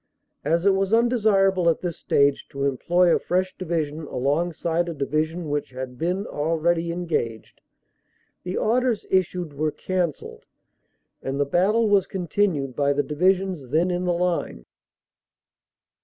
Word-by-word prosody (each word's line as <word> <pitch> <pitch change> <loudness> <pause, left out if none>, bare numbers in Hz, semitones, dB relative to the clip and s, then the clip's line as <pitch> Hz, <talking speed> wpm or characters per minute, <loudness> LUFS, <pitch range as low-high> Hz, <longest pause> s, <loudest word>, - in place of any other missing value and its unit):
As 165 +5 +1
it 200 - +6
was 195 +2 0
undesirable 205 -6 +3
at 165 - 0
this 175 -3 -3
stage 140 0 +1
to 140 0 -3
employ 170 +6 +2
a - - 0
fresh 185 +1 -1
Division 160 -3 -3
alongside 165 +5 -1
a 165 - -5
Division 155 +4 -2
which 145 0 -2
had 130 -1 -7
been 180 +5 -1
already 165 +2 0
engaged, 160 -11 -3 0.8
the 180 +1 -4
orders 240 0 +1
issued 180 -4 0
were 155 +2 0
cancelled 170 - -3 0.8
and 135 +1 -3
the 145 - +2
battle 200 +10 +2
was 200 -2 +3
continued 175 -7 -1
by 140 0 +2
the 145 +1 0
Divisions 180 0 0
then 165 +6 +2
in 180 +1 -1
the 175 - +1
line." 175 - -2
170 Hz, 140 wpm, -24 LUFS, 145-185 Hz, 0.8 s, it